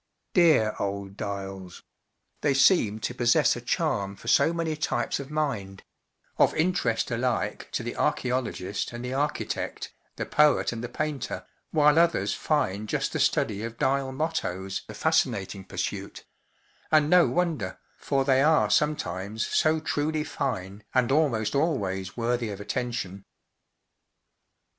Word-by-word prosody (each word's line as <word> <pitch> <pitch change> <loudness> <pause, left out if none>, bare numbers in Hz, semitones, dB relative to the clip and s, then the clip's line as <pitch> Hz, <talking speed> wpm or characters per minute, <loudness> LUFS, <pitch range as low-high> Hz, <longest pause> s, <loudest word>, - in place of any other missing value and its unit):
Dear 155 - +5
old 100 -1 -3
dials! 95 -3 -6 0.6
they 145 -2 +2
seem 130 - +4
to 125 - -2
possess 120 -1 +3
a - - -6
charm 100 0 -1
for 105 - -14
so 130 +5 +5
many 165 -2 -2
types 150 - -1
of 140 -1 -7
mind—of 120 -11 -2
interest 155 -9 +1
alike 120 0 -1
to - - -1
the - - -4
archeolo¬ 125 -1 0
gist 100 +5 -4
and 120 +1 -6
the 125 - -3
architect, 145 +2 -2 0.2
the - - -3
poet 150 -1 +3
and 115 -1 -5
the 120 - -4
painter, 150 -4 -3 0.2
while 150 +1 +4
others 170 0 +2
find 110 -9 -1
just - - -1
the - - -1
study 105 -1 +1
of 115 0 -6
dial 135 0 +1
mottoes 100 - -2
a - - -7
fascinating 95 0 0
pursuit— 95 - -5 0.7
and 155 -2 +5
no 180 +2 +6
wonder, 160 - -1 0.2
for 135 -1 0
they 135 -1 +4
are 155 +2 +4
sometimes 110 - 0
so 155 0 +2
truly 155 0 -1
fine 105 -10 -4
and 130 -1 +3
almost 135 -8 +2
always 100 - -1
worthy 120 -1 0
of 100 -1 -6
attention. 105 -3 -4
125 Hz, 140 wpm, -27 LUFS, 100-150 Hz, 0.7 s, no